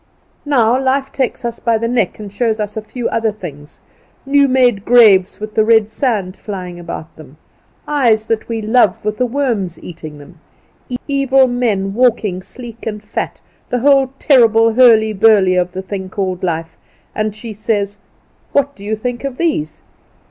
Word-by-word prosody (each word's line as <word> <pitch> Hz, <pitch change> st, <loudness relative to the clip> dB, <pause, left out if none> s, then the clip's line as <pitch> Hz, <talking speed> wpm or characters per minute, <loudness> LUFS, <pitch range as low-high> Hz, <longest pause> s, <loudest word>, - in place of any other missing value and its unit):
Now 250 Hz, -3 st, +3 dB
life 270 Hz, +1 st, 0 dB
takes 260 Hz, -2 st, -2 dB
us 235 Hz, -1 st, -4 dB
by 230 Hz, -2 st, +1 dB
the 230 Hz, +1 st, -2 dB
neck 230 Hz, -6 st, 0 dB
and 205 Hz, -2 st, -9 dB
shows 225 Hz, 0 st, 0 dB
us 210 Hz, -1 st, -4 dB
a 220 Hz, -, -3 dB
few 240 Hz, +3 st, -5 dB
other 225 Hz, -1 st, 0 dB
things, 150 Hz, -8 st, -10 dB, 0.4 s
new 280 Hz, 0 st, +4 dB
made 250 Hz, -6 st, +2 dB
graves 210 Hz, -6 st, +5 dB
with 215 Hz, 0 st, -6 dB
the 220 Hz, -, +3 dB
red 220 Hz, -1 st, +3 dB
sand 215 Hz, -6 st, -1 dB
flying 180 Hz, -4 st, -7 dB
about 165 Hz, -2 st, -8 dB
them; 150 Hz, -2 st, -14 dB, 0.5 s
eyes 235 Hz, -7 st, +2 dB
that 225 Hz, 0 st, -2 dB
we 225 Hz, -1 st, -3 dB
love 215 Hz, -3 st, +2 dB
with 210 Hz, 0 st, -2 dB
the 250 Hz, -, +2 dB
worms 230 Hz, -9 st, -2 dB
eating 155 Hz, -3 st, -9 dB
them; 150 Hz, +4 st, -15 dB, 0.7 s
evil 270 Hz, -2 st, +3 dB
men 220 Hz, -6 st, -1 dB
walking 220 Hz, -6 st, +1 dB
sleek 235 Hz, +2 st, -10 dB
and 210 Hz, -1 st, -5 dB
fat, 210 Hz, -, -5 dB, 0.3 s
the 245 Hz, -, -1 dB
whole 275 Hz, -1 st, +4 dB
terrible 230 Hz, -6 st, +4 dB
hurly 220 Hz, -3 st, +5 dB
burly 200 Hz, -3 st, +4 dB
of 180 Hz, 0 st, 0 dB
the 190 Hz, +1 st, -5 dB
thing 190 Hz, -1 st, -6 dB
called 185 Hz, -2 st, -3 dB
life, 165 Hz, -2 st, -3 dB, 0.4 s
and 215 Hz, -1 st, -2 dB
she 220 Hz, 0 st, -8 dB
says, 205 Hz, -1 st, -2 dB, 0.5 s
"What 280 Hz, 0 st, +1 dB
do 200 Hz, -, -14 dB
you 215 Hz, +2 st, -2 dB
think 240 Hz, +3 st, -4 dB
of 275 Hz, -2 st, -4 dB
these?" 230 Hz, -, -2 dB
220 Hz, 170 wpm, -16 LUFS, 195-245 Hz, 0.7 s, graves